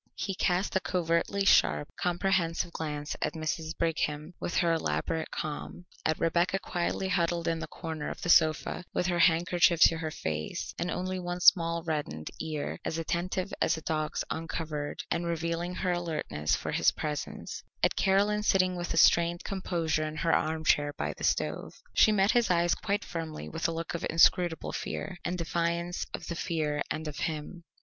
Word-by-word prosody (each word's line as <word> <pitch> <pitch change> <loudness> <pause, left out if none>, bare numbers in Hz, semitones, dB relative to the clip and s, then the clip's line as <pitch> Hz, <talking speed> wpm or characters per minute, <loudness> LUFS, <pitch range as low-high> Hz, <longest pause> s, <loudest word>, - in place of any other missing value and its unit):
He 195 - -2
cast 185 0 0
a - - +5
covertly 180 +2 0
sharp, 75 - +4
comprehensive 175 -1 0
glance 150 -2 -4
at - - 0
Mrs. 160 0 -3
Brigham 155 -1 -1
with 175 - -3
her 170 -2 +3
elaborate 160 0 -1
calm; 155 +3 -5 0.2
at 155 0 0
Rebecca 170 +3 +2
quietly 180 0 -2
huddled 175 -2 0
in 165 0 0
the - - -5
corner 160 -3 -5
of - - -6
the 175 - -2
sofa 160 +1 +4
with - - +1
her 175 -1 0
handkerchief 170 0 +4
to 165 - +7
her 160 -1 -2
face 75 - -4
and 175 - -1
only 185 +1 -2
one 175 0 -4
small 170 -2 +5
reddened 150 - -3
ear 155 -2 -3
as 160 - -2
attentive 180 +4 -2
as - - +2
a - - -7
dog's 155 -1 -1
uncovered 160 -2 -4
and 170 0 0
revealing 170 +1 -2
her 185 -1 0
alertness 155 - -1
for - - -4
his - - +4
presence; 150 -2 -4 0.2
at - - +3
Caroline 200 +2 +2
sitting 185 -3 +3
with 175 -1 -3
a - - -2
strained 170 +1 +4
composure 165 -5 -1
in 155 - -6
her 165 +1 +1
armchair 155 -2 +2
by 75 - -3
the - - -11
stove. - - -1 0.2
She 215 - +6
met 200 -1 +4
his 240 -1 +3
eyes 175 -1 +3
quite 205 -1 -2
firmly 160 -2 -5
with 165 +1 -1
a - - -1
look 165 0 -4
of 170 - -4
inscrutable 165 0 +3
fear, 185 -2 -5
and 180 +1 -2
defiance 170 +1 -1
of - - -6
the 170 - -4
fear 155 -3 -1
and 155 0 -3
of 150 - -6
him. 160 +2 -4
170 Hz, 175 wpm, -29 LUFS, 160-180 Hz, 0.2 s, to